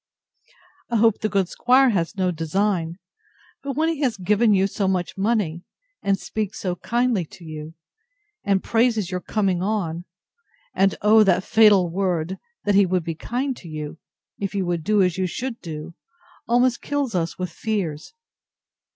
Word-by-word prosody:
I 235 - -1
hope 225 -1 +4
the 215 - -1
good 195 -3 +1
'squire 255 +6 +4
has 185 0 -1
no 185 -1 +1
design: 170 +1 -1 0.6
but 275 0 -4
when 320 +1 +2
he 325 -3 -1
has 250 -7 +1
given 210 +4 +2
you 195 -1 +4
so 195 0 -1
much 185 -2 -1
money, 195 -5 0 0.4
and 195 -1 +1
speaks 215 -1 -4
so 180 -2 -2
kindly 240 -3 0
to 170 +2 -14
you, 155 0 -8 0.7
and 195 -2 +1
praises 225 -5 +1
your 180 - -1
coming 190 -2 0
on; 180 -4 -2 0.7
and, 195 0 +2
oh, 215 +1 +7
that 185 -1 +3
fatal 210 -5 +5
word! 180 -1 -1 0.2
that 205 - +1
he 195 -1 +5
would 180 -1 0
be 165 - -3
kind 250 - -3
to 175 - -12
you, 155 0 -6 0.4
if 200 0 -3
you 195 -2 0
would 175 -2 -2
do 210 +1 +3
as 180 0 0
you 185 - +1
should 240 +6 -5
do, 160 0 -7 0.5
almost 245 +1 +2
kills 285 -5 -2
us 170 -2 -1
with 180 -1 -4
fears. 195 - -3
195 Hz, 170 wpm, -23 LUFS, 175-220 Hz, 0.7 s, oh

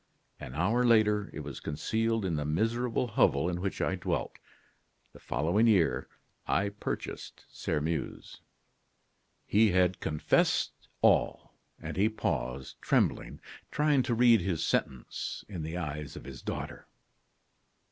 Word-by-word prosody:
An 65 - -8
hour 105 +10 +2
later, 105 -3 +3
it - - -6
was 70 -3 -7
concealed 110 +8 -1
in 85 -4 0
the 75 - -1
miserable 115 +11 0
hovel 85 -9 +2
in 90 0 -2
which 100 0 -2
I - - +1
dwelt. - - -3 0.7
The - - -14
following 90 +10 +1
year 100 -7 +3 0.4
I 100 0 +1
purchased 100 +1 -6
Sairmeuse." 80 +1 -3 1.0
He 110 +1 +4
had 90 0 +3
confessed 75 -1 +1 0.3
all; - - +2 0.3
and - - -6
he 105 +3 +4
paused, 65 - -3
trembling, - - 0 0.3
trying 150 -2 +3
to 120 -1 0
read 120 -3 +6
his 85 -3 -1
sentence 65 - -2
in 95 -5 -6
the 80 +3 -4
eyes 75 -3 -5
of - - -8
his 65 -3 -9
daughter. - - -6
95 Hz, 130 wpm, -30 LUFS, 75-110 Hz, 1.0 s, read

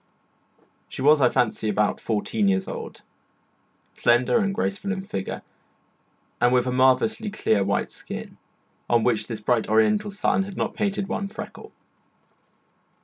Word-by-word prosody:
She - - -5
was, 150 +1 +5
I 125 - +5
fancy, 110 -2 0
about 105 0 +1
fourteen 105 -1 0
years 95 -1 +1
old, - - -7 0.9
slender 120 +1 +3
and 200 -1 +1
graceful 200 -1 -2
in 195 -2 -3
figure, 95 - -5 1.0
and 120 - +4
with 125 -1 +3
a 125 - -1
marvellously 130 - +2
clear 110 - +1
white 100 +1 -1
skin, - - -8 0.5
on 120 -1 +3
which 110 -3 +1
this 110 -3 -5
bright 115 0 +1
Oriental 205 - +3
sun 200 -1 +1
had 195 0 -6
not - - -1
painted 200 -2 -1
one 200 - -2
freckle. 210 - -9
125 Hz, 145 wpm, -24 LUFS, -, 1.0 s, was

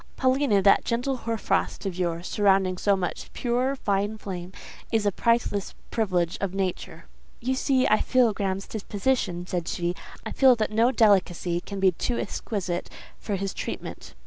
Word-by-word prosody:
Paulina, 260 -6 +3
that 200 - +5
gentle 245 +3 -1
hoar 230 -2 -3
frost - - -1
of 190 -3 -2
yours, 175 -1 -2
surrounding 190 -3 +2
so 200 -1 +3
much 185 -2 -4
pure, 250 +2 0
fine 205 -2 -1
flame, 185 -3 -6 0.4
is 220 -2 +1
a 205 - +3
priceless 230 -2 0 0.2
privilege 180 -6 0
of 195 -1 -2
nature." 190 -2 -3 0.3
"You 255 +2 -1
see 260 0 +2
I 215 - +3
feel 250 -4 +3
Graham's 195 -1 -2
disposition," 205 -4 -1
said 175 -2 -3
she. 175 0 -1 0.3
"I - - -4
feel 265 -2 +6
that 215 -2 -1
no 230 +3 +3
delicacy 185 -6 +2
can 200 +1 -6
be 190 -1 +5
too 235 +7 -2
exquisite 185 -5 -3 0.3
for 205 - -3
his 195 0 -3
treatment." - - -6
200 Hz, 165 wpm, -26 LUFS, 185-235 Hz, 0.4 s, feel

